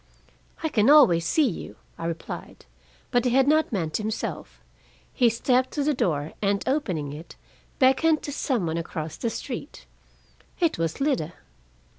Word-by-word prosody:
"I 320 Hz, -, +1 dB
can 220 Hz, -3 st, +3 dB
always 180 Hz, -, +6 dB
see 305 Hz, -, +3 dB
you," 195 Hz, -, -6 dB, 0.2 s
I 165 Hz, -, -6 dB
replied. 165 Hz, -1 st, -7 dB, 0.5 s
But 245 Hz, -1 st, +3 dB
he 250 Hz, -, +2 dB
had 265 Hz, +2 st, +3 dB
not 310 Hz, 0 st, +3 dB
meant 165 Hz, -8 st, -1 dB
himself. 215 Hz, +1 st, -4 dB, 0.5 s
He 245 Hz, -3 st, +4 dB
stepped 250 Hz, +3 st, +1 dB
to 290 Hz, -, 0 dB
the 300 Hz, +1 st, +2 dB
door, 155 Hz, -, -1 dB
and 200 Hz, -1 st, +1 dB
opening 180 Hz, -, -1 dB
it, 155 Hz, +3 st, -10 dB, 0.4 s
beckoned 285 Hz, +4 st, +3 dB
to 290 Hz, -, -4 dB
some 260 Hz, -, -1 dB
one 160 Hz, 0 st, -2 dB
across 160 Hz, -1 st, -5 dB
the 230 Hz, -, -2 dB
street. 255 Hz, +5 st, -7 dB, 0.7 s
It 335 Hz, -, +1 dB
was 165 Hz, -, -2 dB
Lida! 175 Hz, -, 0 dB
235 Hz, 155 wpm, -25 LUFS, 165-280 Hz, 0.7 s, always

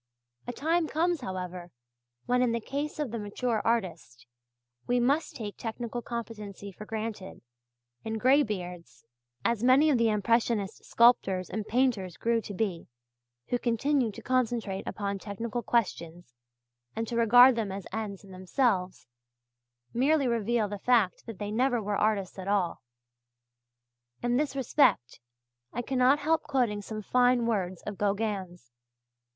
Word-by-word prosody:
A -, -, -2 dB
time 320 Hz, +6 st, 0 dB
comes, 335 Hz, 0 st, 0 dB
however, 180 Hz, -4 st, -5 dB, 0.6 s
when 250 Hz, 0 st, +2 dB
in 245 Hz, -2 st, +2 dB
the 235 Hz, -, 0 dB
case 285 Hz, +6 st, -4 dB
of 295 Hz, -6 st, -2 dB
the 230 Hz, -, -3 dB
mature 215 Hz, +2 st, -2 dB
artist, 185 Hz, -, -2 dB, 0.6 s
we 245 Hz, 0 st, +2 dB
must 280 Hz, +6 st, +1 dB
take 210 Hz, -4 st, -6 dB
technical 235 Hz, +1 st, -4 dB
competency 215 Hz, -4 st, -7 dB
for 210 Hz, +3 st, -11 dB
granted, 215 Hz, -, -5 dB, 0.6 s
and 220 Hz, 0 st, -3 dB
graybeards, 210 Hz, -, 0 dB, 0.4 s
as 235 Hz, -1 st, +1 dB
many 270 Hz, +5 st, +5 dB
of 255 Hz, -, +2 dB
the 230 Hz, -1 st, +3 dB
impressionist 215 Hz, -1 st, 0 dB
sculptors 195 Hz, -6 st, +3 dB
and 215 Hz, +2 st, -4 dB
painters 225 Hz, -8 st, 0 dB
grew 230 Hz, 0 st, +1 dB
to 205 Hz, -, -8 dB
be, 185 Hz, -5 st, -2 dB, 0.6 s
who 245 Hz, -, 0 dB
continue 245 Hz, +2 st, +1 dB
to -, -, -10 dB
concentrate 235 Hz, -6 st, -1 dB
upon 200 Hz, -1 st, -3 dB
technical 225 Hz, +4 st, -4 dB
questions 175 Hz, -, -2 dB, 0.6 s
and 225 Hz, 0 st, -2 dB
to 235 Hz, -, -4 dB
regard 245 Hz, +2 st, +7 dB
them 220 Hz, -4 st, -2 dB
as 195 Hz, -1 st, -6 dB
ends 210 Hz, -3 st, -4 dB
in 195 Hz, -, -14 dB
themselves, 185 Hz, 0 st, -1 dB, 0.9 s
merely 275 Hz, +3 st, +2 dB
reveal 230 Hz, -1 st, +1 dB
the 205 Hz, 0 st, -6 dB
fact 230 Hz, -5 st, +2 dB
that 225 Hz, -4 st, -7 dB
they 205 Hz, 0 st, -4 dB
never 245 Hz, +2 st, +2 dB
were 205 Hz, -1 st, -2 dB
artists 200 Hz, -3 st, 0 dB
at 190 Hz, -, -6 dB
all. 200 Hz, -4 st, 0 dB, 1.4 s
In 240 Hz, 0 st, +2 dB
this 290 Hz, -1 st, -1 dB
respect 245 Hz, -, +2 dB, 0.5 s
I 245 Hz, -, -3 dB
cannot 260 Hz, +2 st, +3 dB
help 315 Hz, +2 st, +1 dB
quoting 235 Hz, -7 st, 0 dB
some 215 Hz, +1 st, -6 dB
fine 245 Hz, +1 st, +3 dB
words 185 Hz, -6 st, -2 dB
of 210 Hz, -2 st, -6 dB
Gauguin's. 195 Hz, -, -2 dB
225 Hz, 145 wpm, -29 LUFS, 200-245 Hz, 1.4 s, regard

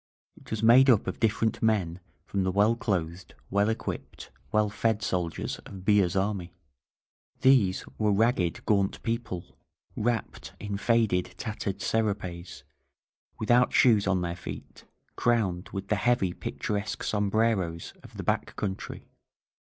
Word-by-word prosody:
It -, -, -17 dB
was 110 Hz, 0 st, -3 dB
made 130 Hz, +4 st, +7 dB
up 115 Hz, -5 st, +5 dB
of -, -, -4 dB
different 110 Hz, 0 st, +1 dB
men 95 Hz, -6 st, +1 dB, 0.3 s
from 100 Hz, 0 st, -1 dB
the 95 Hz, -, +1 dB
well 105 Hz, +4 st, +3 dB
clothed, 90 Hz, -7 st, -3 dB, 0.2 s
well 100 Hz, +2 st, +3 dB
equipped, 110 Hz, -, -5 dB, 0.2 s
well 105 Hz, 0 st, +3 dB
fed 110 Hz, 0 st, 0 dB
soldiers 90 Hz, -4 st, -2 dB
of -, -, -13 dB
Villa's 95 Hz, -1 st, +2 dB
army. 95 Hz, -3 st, -1 dB, 0.9 s
These 120 Hz, -8 st, +4 dB
were 105 Hz, -1 st, +2 dB
ragged, 100 Hz, -4 st, +1 dB
gaunt 100 Hz, -2 st, +1 dB
people, 115 Hz, -6 st, -4 dB, 0.4 s
wrapped 120 Hz, +1 st, -2 dB
in 100 Hz, -1 st, -4 dB
faded, 110 Hz, -5 st, +1 dB
tattered 105 Hz, -1 st, -4 dB
serapes, 95 Hz, -6 st, -2 dB, 0.7 s
without 120 Hz, +3 st, +3 dB
shoes 110 Hz, -6 st, +5 dB
on 95 Hz, -1 st, +2 dB
their 85 Hz, -1 st, -2 dB
feet, 90 Hz, -, -9 dB, 0.3 s
crowned 105 Hz, -7 st, 0 dB
with 95 Hz, -, -5 dB
the 105 Hz, -, +2 dB
heavy, 110 Hz, -4 st, +1 dB
picturesque 105 Hz, +3 st, -4 dB
sombreros 105 Hz, -5 st, 0 dB
of -, -, -14 dB
the -, -, -4 dB
back -, -, -1 dB
country. 95 Hz, -2 st, -5 dB
105 Hz, 135 wpm, -28 LUFS, 95-110 Hz, 0.9 s, made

